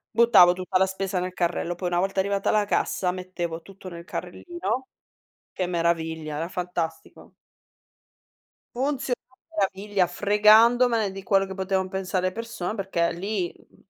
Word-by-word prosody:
buttavo 230 -7 +7
tutta 185 +1 -1
la 190 - +4
spesa 190 -1 -2
nel 180 0 -3
carrello, 175 0 -1
poi 175 0 -3
una 175 0 +1
volta 195 +1 0
arrivata 200 0 -1
alla 210 -1 +3
cassa 180 -2 0
mettevo 175 -2 -5
tutto 195 0 -11
nel 170 0 -9
carrellino. 260 - -4 0.7
Che 185 - -2
meraviglia, 165 -3 -1
era 165 +2 -3
fantastico. 170 -3 -5 1.4
Funziona 270 -1 -1
a 260 - -28 0.4
meraviglia, 195 -1 0
fregandomene 215 +3 +4
di 195 0 -8
quello 195 0 +3
che 190 - -7
potevan 190 0 -1
pensare 185 -1 -1
le 185 - -1
persone, 230 -4 -4
perché 190 -4 0
lì, 185 0 -2
mhmm, - - -24
190 Hz, 145 wpm, -25 LUFS, 175-205 Hz, 1.4 s, buttavo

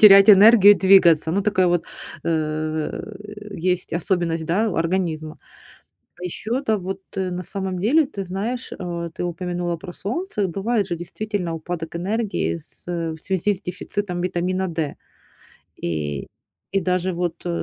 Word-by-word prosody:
терять 200 -1 +10
энергию 205 0 +9
и - - -5
двигаться. 170 -5 +5
Ну, 200 +1 +1
такая 195 -3 +2
вот, 175 -1 +2 0.4
э, - - -3
в, 165 +7 -3
э, - - -6 0.2
есть 180 - -5
особенность, 165 -2 0
да, 210 +7 +2
у - - -4
организма. 165 -2 -1 0.8
А 180 - -8
ещё, 225 +8 -2
да, 220 - +3
вот, 190 +1 -5 0.2
э, 185 -1 0
на 180 +1 -4
самом 190 0 -4
деле, 280 - +4
ты 200 -7 -5
знаешь, 215 +8 -4
а, - - -5 0.3
ты 160 - -6
упомянула 175 0 -2
про 180 +1 -8
солнце. 215 - -2
Бывает 200 +4 0
же 175 - -2
действительно 180 0 -4
упадок 165 0 -5
энергии 205 +1 -1
с 155 - -13 0.3
в 160 - -7
связи 190 +4 -1
с 190 - -10
дефицитом 180 0 -4
витамина 185 +1 -1
D. 160 -3 -2 0.9
И, 75 -4 -2 0.5
и - - +4
даже 185 0 0
вот, 175 -1 -1
э, 175 - -3
185 Hz, 160 wpm, -22 LUFS, 170-200 Hz, 0.9 s, терять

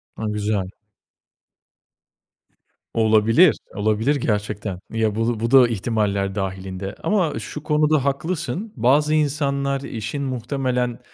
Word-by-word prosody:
A! 110 - -5
Güzel. 105 -2 -1 2.3
Olabilir, 110 +9 +4 0.2
olabilir 110 +7 +1
gerçekten. 105 -5 -2
Ya, 110 -2 0
bu 115 0 0
bu 115 +1 -1
da 130 -3 +7
ihtimaller 100 -3 -1
dâhilinde 95 0 -4
ama 185 -7 +1
şu 150 - -7
konuda 150 -2 +2
haklısın, 170 +8 -2
bazı 140 +6 +3
insanlar 140 -2 0
işin 130 +2 -4
muhtemelen, 125 -1 -2
120 Hz, 100 wpm, -22 LUFS, 105-140 Hz, 2.3 s, da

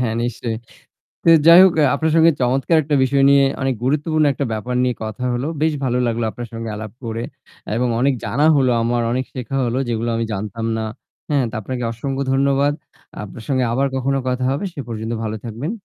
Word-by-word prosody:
হ্যাঁ 115 -3 0
নিশ্চয়ই। 120 -1 -3 0.7
তো - - +2 0.2
যাই 170 +2 +10
হোক 190 - +4
অ্যা 150 - +5
আপনার 160 0 0
সঙ্গে 165 0 +6
চমৎকার! 135 +6 +2
একটা 145 -1 +1
বিষয় 135 +1 +2
নিয়ে 140 0 +6 0.2
অনেক 135 -1 +1
গুরুত্বপূর্ণ 155 +3 +1
একটা 140 - -3
ব্যাপার 115 +3 -3
নিয়ে 125 - 0
কথা 110 +4 -5
হল। 120 - -2 0.2
বেশ 160 - +3
ভালো 125 -1 0
লাগলো 115 0 -1
আপনার 120 -1 -7
সঙ্গে 115 0 -5
আলাপ 110 -1 -7
করে। 115 0 -3 0.5
এবং 125 +1 +1
অনেক 135 +1 +3
জানা 145 +5 +1
হলো 130 -2 +3
আমার, 120 +1 0
অনেক 130 +1 -1
শেখা 130 +1 -4
হল 120 0 -1
যেগুলো 115 0 -1
আমি 115 - -1
জানতাম 105 +3 -4
না, 110 - -2 0.5
হ্যা? 145 - +2
তো - - -10
আপনাকে 125 +3 -4
অসংখ্য 135 +4 -3
ধন্যবাদ। 140 +1 +2 0.5
আপনার 105 +3 -10
সঙ্গে 130 -2 +1
আবার 135 +3 +1
কখনো 135 +1 0
কথা 125 0 -1
হবে। 140 +8 -3
সে - - -5
পর্যন্ত 110 0 -4
ভালো 110 0 -3
থাকবেন। 120 - -4
125 Hz, 200 wpm, -20 LUFS, 115-140 Hz, 0.7 s, যাই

